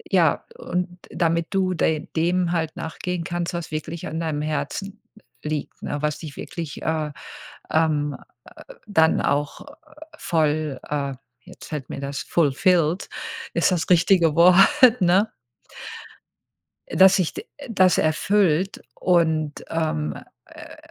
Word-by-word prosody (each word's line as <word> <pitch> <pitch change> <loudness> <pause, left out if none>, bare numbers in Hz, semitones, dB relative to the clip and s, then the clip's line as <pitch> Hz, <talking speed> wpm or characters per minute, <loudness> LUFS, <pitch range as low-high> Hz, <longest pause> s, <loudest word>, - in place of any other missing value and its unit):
ja, - - +3
und 180 - -2 0.2
damit 165 -1 0
du 190 -1 +1
de 160 -2 0
dem 175 +2 +1
halt 160 -2 -1
nachgehen 175 +2 -4
kannst, 175 +1 -3
was 170 -1 -4
wirklich 155 +2 -5
an 160 - -4
deinem 155 -3 -2
Herzen 195 +7 -4 0.4
liegt, 150 -1 -4
ne? 145 - -3
Was 150 -1 -1
dich 150 -4 -9
wirklich, 165 -4 -7
äh, 155 -2 -1 0.6
ähm, 150 -3 +1 0.7
dann 160 -6 +3
auch 145 0 -1 0.5
voll, 155 -4 0
äh 140 -2 -2 0.3
jetzt - - -13
fällt 150 -4 -5
mir - - -5
das 140 0 -4
fulfilled 170 +2 +1 0.5
ist - - +3
das 175 -3 -1
richtige 175 -3 +4
Wort, 180 +2 +6 0.4
ne? 190 +5 +3 1.6
Dass 190 0 +6
sich 185 -4 0
d 415 - -7 0.2
das 185 -6 +4
erfüllt 185 +2 +1
und, 160 -4 +1
ähm, 75 - -1 0.3
äh - - -12
165 Hz, 125 wpm, -23 LUFS, 150-180 Hz, 1.6 s, Wort